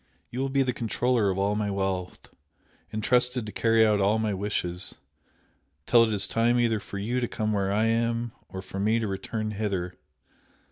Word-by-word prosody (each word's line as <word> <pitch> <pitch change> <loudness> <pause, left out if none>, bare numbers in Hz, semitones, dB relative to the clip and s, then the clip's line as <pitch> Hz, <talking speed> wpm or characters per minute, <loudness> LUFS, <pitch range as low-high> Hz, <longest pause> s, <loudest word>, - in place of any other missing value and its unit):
You 125 - -4
will 135 +1 0
be 135 0 +2
the 125 -1 -1
controller 120 -1 +1
of 95 - -1
all 100 +1 +1
my 105 -1 -1
wealth, 95 -2 -3 0.6
entrusted 125 +2 +1
to 105 - -6
carry 115 0 +3
out 105 -1 +3
all 100 +3 +3
my 110 -2 0
wishes, 95 -2 -3 0.9
till 115 -1 +6
it 110 - -2
is 100 -2 +2
time 120 +2 +2
either 115 -2 +2
for 100 0 -8
you 115 +6 -1
to 120 - -1
come 110 -1 -2
where 100 -1 0
I 105 +2 +2
am, 115 +1 0 0.2
or 95 0 -7
for 95 - -6
me 110 +3 +2
to 115 -2 -1
return 105 +3 -3
hither. 100 -4 -2
110 Hz, 190 wpm, -27 LUFS, 100-115 Hz, 0.9 s, till